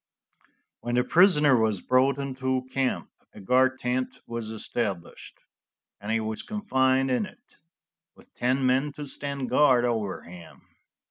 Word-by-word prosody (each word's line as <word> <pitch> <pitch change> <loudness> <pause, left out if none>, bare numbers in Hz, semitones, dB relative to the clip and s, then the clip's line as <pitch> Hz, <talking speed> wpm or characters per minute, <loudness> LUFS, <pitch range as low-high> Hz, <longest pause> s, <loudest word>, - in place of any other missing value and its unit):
When 120 0 -3
the 125 - +3
prisoner 150 -3 +5
was 110 -5 0
brought 130 +2 +3
into 130 -2 -2
camp 135 -1 -1 0.2
a - - -10
guard 130 +6 +2
tent 125 0 -2
was 115 -2 -5
established, 105 -4 -5 0.6
and 105 +2 -5
he 115 - +2
was 110 0 -4
confined 130 -10 +1
in 160 +11 0
it, 240 +6 -20 0.6
with - - -21
ten 130 +2 0
men 135 +3 +1
to 150 0 -7
stand 140 -1 -5
guard 130 -5 +4
over 110 -5 -2
him. 85 -1 -13
130 Hz, 140 wpm, -26 LUFS, 115-135 Hz, 0.6 s, prisoner